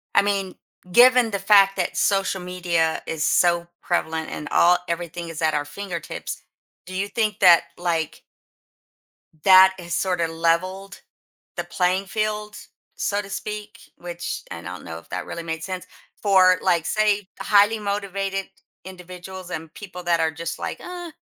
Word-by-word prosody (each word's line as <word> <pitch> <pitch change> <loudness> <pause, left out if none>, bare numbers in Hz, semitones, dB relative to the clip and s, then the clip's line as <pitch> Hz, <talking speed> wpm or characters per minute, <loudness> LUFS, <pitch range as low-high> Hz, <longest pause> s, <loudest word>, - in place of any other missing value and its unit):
I - - +6
mean, 195 -2 -1 0.4
given 245 +1 +6
the 200 - -2
fact 195 0 +5
that - - -2
social 195 -1 +1
media 175 -3 -1
is 160 -1 -2
so 170 -1 +3 0.2
prevalent 160 -2 -1
and 150 - -6
all, 180 +1 +5
everything 170 0 -4
is 165 0 -6
at 155 -1 +2
our 145 0 0
fingertips, 170 0 -6 0.4
do 185 - -8
you 195 +2 -1
think 215 -3 -1
that, 175 -3 +7
like 165 -3 -2 1.2
That 190 0 +8
is 175 -1 -8
sorta 180 -3 0
leveled 170 +4 -1 0.5
the - - -2
playing 185 +2 0
field, 210 0 -3 0.4
so 205 0 -1
to 200 - -9
speak, 210 0 -6 0.2
which 175 0 -6
and 85 0 -8
I 90 - -5
don't - - -11
know 80 0 -6
if 80 - -17
that 90 -1 -4
really 170 - -6
made 160 -1 -5
sense? 185 -1 -5 0.4
For, 185 -3 +5
like, 170 -2 +2
say, 210 -2 +1
highly 210 +2 +4
motivated 195 -1 -3 0.4
individuals 185 0 -9
and 160 -2 -6
people 180 -3 -9
that 170 -1 +2
are 160 0 +2
just 165 +1 -5
like, - - -5
"Uh, 350 -2 -8
185 Hz, 160 wpm, -23 LUFS, 170-200 Hz, 1.2 s, That